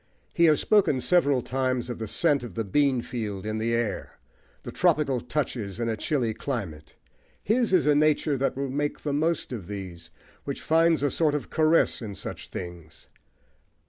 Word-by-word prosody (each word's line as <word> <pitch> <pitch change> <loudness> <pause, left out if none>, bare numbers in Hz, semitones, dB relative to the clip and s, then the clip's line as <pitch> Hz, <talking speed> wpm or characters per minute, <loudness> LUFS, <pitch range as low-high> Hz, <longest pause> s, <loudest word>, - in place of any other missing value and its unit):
He 170 - +4
has 155 -2 +5
spoken 200 -11 +3
several 140 -5 +2
times 130 -1 -1
of 120 -2 -5
the 110 - -4
scent 145 +3 +2
of 120 - -8
the 115 - -1
bean 135 +4 +2
field 105 -6 -5
in 110 0 -2
the 115 +1 -1
air: 115 -2 -3 0.5
the - - -7
tropical 140 -5 +2
touches 115 -9 -3
in 115 - -1
a 110 - 0
chilly 120 0 -1
climate; 95 - -5 0.5
his 230 +2 +1
is 185 -7 +4
a 150 - +5
nature 150 0 +2
that 135 0 -1
will 135 -1 -2
make 145 +2 -2
the 145 - -2
most 155 -1 0
of 100 -8 -6
these, 95 -5 -7 0.3
which 140 - -4
finds 165 -1 +3
a 145 - +2
sort 155 -3 +2
of 150 - -5
caress 160 -2 +3
in 105 -3 -6
such - - -6
things. 85 -3 -9
130 Hz, 180 wpm, -26 LUFS, 110-150 Hz, 0.5 s, has